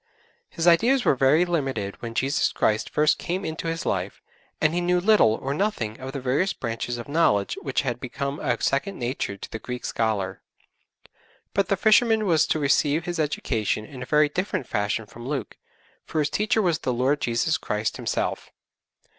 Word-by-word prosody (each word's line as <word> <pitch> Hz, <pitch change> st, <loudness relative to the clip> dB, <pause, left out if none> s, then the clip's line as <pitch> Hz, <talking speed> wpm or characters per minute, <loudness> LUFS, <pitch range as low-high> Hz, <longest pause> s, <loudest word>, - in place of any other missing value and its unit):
His 165 Hz, -2 st, -3 dB
ideas 240 Hz, +10 st, +4 dB
were -, -, +5 dB
very 135 Hz, +6 st, +4 dB
limited 135 Hz, -, -2 dB
when 115 Hz, -1 st, -6 dB
Jesus 135 Hz, +4 st, +1 dB
Christ 110 Hz, 0 st, 0 dB
first 150 Hz, 0 st, +2 dB
came 185 Hz, +3 st, -3 dB
into 160 Hz, +1 st, -4 dB
his 165 Hz, 0 st, -3 dB
life, -, -, -2 dB, 0.4 s
and 155 Hz, +1 st, +2 dB
he 175 Hz, -, 0 dB
knew 180 Hz, 0 st, +2 dB
little 180 Hz, -, +4 dB
or 135 Hz, +4 st, -3 dB
nothing 140 Hz, -, -2 dB
of 130 Hz, +1 st, -6 dB
the 140 Hz, -, -4 dB
various 135 Hz, +9 st, +1 dB
branches 120 Hz, 0 st, -4 dB
of 120 Hz, -, -7 dB
knowledge 140 Hz, -10 st, +2 dB
which 135 Hz, -, 0 dB
had 125 Hz, -3 st, -2 dB
become 140 Hz, +3 st, -4 dB
a 120 Hz, -2 st, -1 dB
second 185 Hz, +8 st, 0 dB
nature 120 Hz, -5 st, -3 dB
to -, -, -9 dB
the 110 Hz, -, -5 dB
Greek 125 Hz, +1 st, -6 dB
scholar; 100 Hz, -4 st, -1 dB, 1.1 s
but 200 Hz, -2 st, +1 dB
the 195 Hz, -, +1 dB
fisherman 220 Hz, +1 st, +4 dB
was 165 Hz, -5 st, +3 dB
to -, -, +1 dB
receive 145 Hz, +2 st, +2 dB
his 175 Hz, -1 st, -3 dB
education 115 Hz, -8 st, -1 dB
in 130 Hz, +1 st, -10 dB
a -, -, -4 dB
very 150 Hz, 0 st, +4 dB
different 180 Hz, -3 st, -2 dB
fashion 105 Hz, 0 st, -1 dB
from 120 Hz, +4 st, -10 dB
Luke, 140 Hz, -2 st, -3 dB, 0.5 s
for -, -, -6 dB
his 150 Hz, -1 st, +1 dB
teacher 215 Hz, +1 st, +1 dB
was 170 Hz, -4 st, +1 dB
the 130 Hz, -, -1 dB
Lord 130 Hz, +4 st, +1 dB
Jesus 125 Hz, +5 st, +1 dB
Christ 105 Hz, +1 st, -2 dB
Himself. -, -, -2 dB
140 Hz, 185 wpm, -25 LUFS, 120-170 Hz, 1.1 s, were